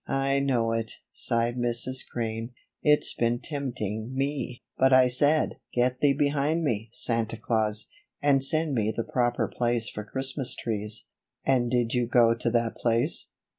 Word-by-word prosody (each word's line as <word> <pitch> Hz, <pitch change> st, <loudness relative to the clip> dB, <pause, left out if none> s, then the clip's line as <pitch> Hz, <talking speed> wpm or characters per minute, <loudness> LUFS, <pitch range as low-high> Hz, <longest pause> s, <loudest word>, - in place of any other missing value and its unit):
"I 135 Hz, 0 st, 0 dB
know 125 Hz, -5 st, 0 dB
it," 115 Hz, -1 st, 0 dB, 0.2 s
sighed 120 Hz, 0 st, 0 dB
Mrs. 120 Hz, +2 st, +1 dB
Crane. 115 Hz, 0 st, -4 dB, 0.3 s
"It's 150 Hz, 0 st, +4 dB
been 120 Hz, 0 st, 0 dB
tempting 120 Hz, -, -4 dB
me; 135 Hz, -2 st, -3 dB
but 130 Hz, 0 st, +3 dB
I 130 Hz, 0 st, +6 dB
said: 145 Hz, +5 st, +2 dB, 0.2 s
'Get 125 Hz, +1 st, 0 dB
thee 145 Hz, -1 st, +3 dB
behind 145 Hz, +3 st, 0 dB
me, 115 Hz, -6 st, -2 dB
Santa 115 Hz, -1 st, +1 dB
Claus, 110 Hz, -1 st, +1 dB, 0.3 s
and 140 Hz, -2 st, +3 dB
send 155 Hz, +2 st, +2 dB
me 110 Hz, -3 st, 0 dB
to -, -, -12 dB
the 115 Hz, -, -2 dB
proper 120 Hz, -5 st, 0 dB
place 120 Hz, -2 st, 0 dB
for 105 Hz, -, -7 dB
Christmas 130 Hz, +3 st, -2 dB
trees.'" 105 Hz, -1 st, -2 dB, 0.4 s
"And 125 Hz, -3 st, +2 dB
did 120 Hz, -1 st, 0 dB
you 125 Hz, -2 st, 0 dB
go 120 Hz, -1 st, +4 dB
to 120 Hz, +1 st, -2 dB
that 115 Hz, -1 st, -1 dB
place?" 120 Hz, +6 st, +1 dB
120 Hz, 160 wpm, -26 LUFS, 115-135 Hz, 0.4 s, I